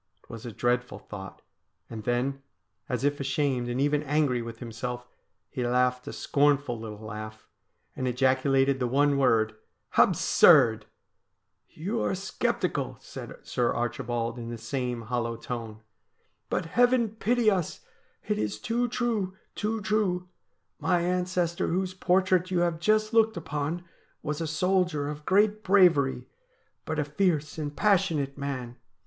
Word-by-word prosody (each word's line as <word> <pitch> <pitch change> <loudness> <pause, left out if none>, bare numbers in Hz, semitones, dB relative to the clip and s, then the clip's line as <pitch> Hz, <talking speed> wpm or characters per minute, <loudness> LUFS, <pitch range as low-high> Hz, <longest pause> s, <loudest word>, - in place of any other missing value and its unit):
It - - -15
was 115 +1 -8
a - - -5
dreadful 125 +3 -1
thought; 95 -2 -10 0.4
and 110 -1 -8
then, 130 +3 0 0.5
as 125 0 -2
if 145 0 +1
ashamed 135 -3 0
and 120 +1 -2
even 145 +1 +2
angry 145 -4 +1
with 115 -1 -7
himself, 120 +1 -5 0.4
he 125 - -4
laughed 125 +1 +1
a - - -4
scornful 140 -4 +1
little 110 -1 -8
laugh, 110 0 -8 0.5
and 130 - -2
ejaculated 135 +1 +2
the 125 - 0
one 140 +3 +3
word: 110 -4 +3 0.2
' - - -15
Absurd! 110 -1 +5 0.3
' - - -52
' - - -50
You 205 +9 -2
are - - 0
sceptical,' 195 +2 -2
said - - -9
Sir 120 -1 0
Archibald 120 0 -2
in 115 0 -6
the 120 - -5
same 125 -1 -3
hollow 115 0 -2
tone. 115 -2 -6 0.3
' - - -45
But, 180 - -1
heaven 245 +5 +3
pity 220 +1 +2
us! 180 -5 -2 0.5
it - - 0
is 105 0 -2
too 240 - 0
true— 225 -6 -1 0.2
too 220 +1 -2
true. 200 -4 0 0.5
My 180 -2 +2
ancestor 180 -1 0
whose 185 +2 -1
portrait 185 0 +2
you 180 -2 +1
have 170 -2 0
just 215 +4 +2
looked 220 -3 +4
upon 155 +2 -3 0.4
was 150 +1 -3
a 165 - -1
soldier 175 -2 +1
of 150 0 -7
great 210 +2 +3
bravery, 165 -10 +4 0.6
but 160 - -3
a 150 - +2
fierce 155 -1 0
and 145 -1 -4
passionate 175 -9 +2
man. 130 -4 -5
145 Hz, 150 wpm, -28 LUFS, 120-180 Hz, 0.6 s, Absurd